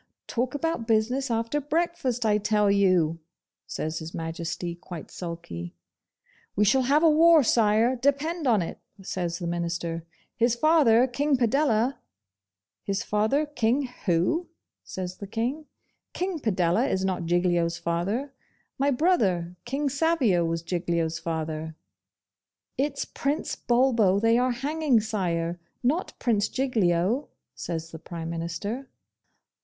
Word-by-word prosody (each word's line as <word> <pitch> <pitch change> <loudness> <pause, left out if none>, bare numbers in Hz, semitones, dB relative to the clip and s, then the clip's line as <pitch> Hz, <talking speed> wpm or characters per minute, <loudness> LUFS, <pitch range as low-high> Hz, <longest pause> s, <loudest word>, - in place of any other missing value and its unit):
'Talk 250 +3 -2
about 305 -6 -2
business 245 +5 +1
after 230 +5 -1
breakfast, 290 -6 -1
I 210 -1 +3
tell 210 -1 +2
you!' 185 -5 +3 0.5
says 155 0 -3
His 160 +1 -8
Majesty, 170 +1 -4
quite 170 -1 -9
sulky. 85 - -7 0.8
'We 210 - +3
shall 260 +6 +4
have 285 +5 +3
a 325 - +7
war, 325 0 +6
Sire, 225 +2 +3
depend 285 +5 0
on 215 -7 +3
it,' - - -7 0.2
says 175 -2 -3
the 175 - -5
Minister. 170 -1 -3 0.3
'His 235 0 +2
father, 255 -4 +5
King 280 +2 +1
Padella.. 245 0 +2 0.4
.' 95 +2 -64
'His 195 -1 -2
father, 220 +9 +1
King 265 -2 0 0.2
WHO?' 180 - +1 0.4
says 185 -1 -6
the 200 - -7
King. 245 +9 -3 0.5
'King 365 -2 -2
Padella 205 - +1
is 190 0 0
not 185 -3 -1
Giglio's 175 -1 +1
father. 180 +11 -2 0.5
My 280 +1 +3
brother, 210 - +1
King 275 +4 -1
Savio, 275 - +2
was 165 0 -2
Giglio's 170 -2 -1
father.' 160 -1 -4 1.0
'It's 280 +1 -1
Prince 285 +2 -2
Bulbo 235 -6 +3
they 225 +2 +3
are 250 +1 +2
hanging, 275 +1 +1
Sire, 175 -6 -2 0.2
not 300 +9 0
Prince 215 -4 +1
Giglio,' 225 -2 +1 0.3
says 165 -1 -5
the 160 - -8
Prime 165 0 -6
Minister. 170 +10 -4
215 Hz, 130 wpm, -26 LUFS, 170-270 Hz, 1.0 s, a